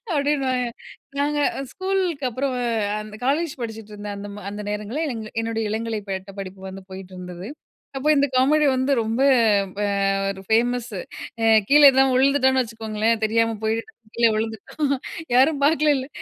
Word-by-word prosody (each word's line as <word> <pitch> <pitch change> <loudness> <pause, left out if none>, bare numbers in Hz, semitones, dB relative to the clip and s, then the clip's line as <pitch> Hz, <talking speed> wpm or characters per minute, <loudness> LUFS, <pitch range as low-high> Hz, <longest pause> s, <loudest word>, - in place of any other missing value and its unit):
அப்டீன்னுவாங்க. 270 -4 +1 0.5
நாங்க 295 +1 +1 0.3
ஸ்கூலுக்கு 375 -6 -1
அப்புறம் 260 +2 -2 0.5
அந்த 215 0 -10
காலேஜ் 295 +3 +1
படிச்சுட்ருந்தேன். 210 -2 -6
அந்த 200 +1 -7
ம 205 - -9
அந்த 205 +1 -6
நேரங்கள்ல 210 +9 -3
எங் 225 -2 -5 0.2
என்னுடைய 225 0 -2
இளங்கலை 225 0 -2
பட்டபடிப்பு 190 0 -6
வந்து 190 0 -9
போயிட்டிருந்தது. 185 0 -8 0.5
அப்போ 270 - -2
இந்த 285 -1 +3
காமெடி 290 +4 +4
வந்து 260 +2 0
ரொம்ப 225 +2 -1 0.6
ப - - -2 0.5
ஒரு 195 -1 -5
ஃபேமஸு. 235 -2 0 0.4
அ - - 0 0.2
கீழே 295 +1 +6
எதுனா 265 0 +4
விழுந்துட்டோன்னு 265 0 +3
வச்சுக்கோங்களேன், 220 -1 -1
தெரியாம 225 +1 +2
போயிட்டு 220 +1 0 0.3
கீழ 235 0 +4
விழுந்துட்டோம், 225 +6 -2 0.4
"யாரும் 280 +3 +4
பார்க்கலைல" 295 -3 +2
230 Hz, 135 wpm, -23 LUFS, 215-275 Hz, 0.6 s, கீழே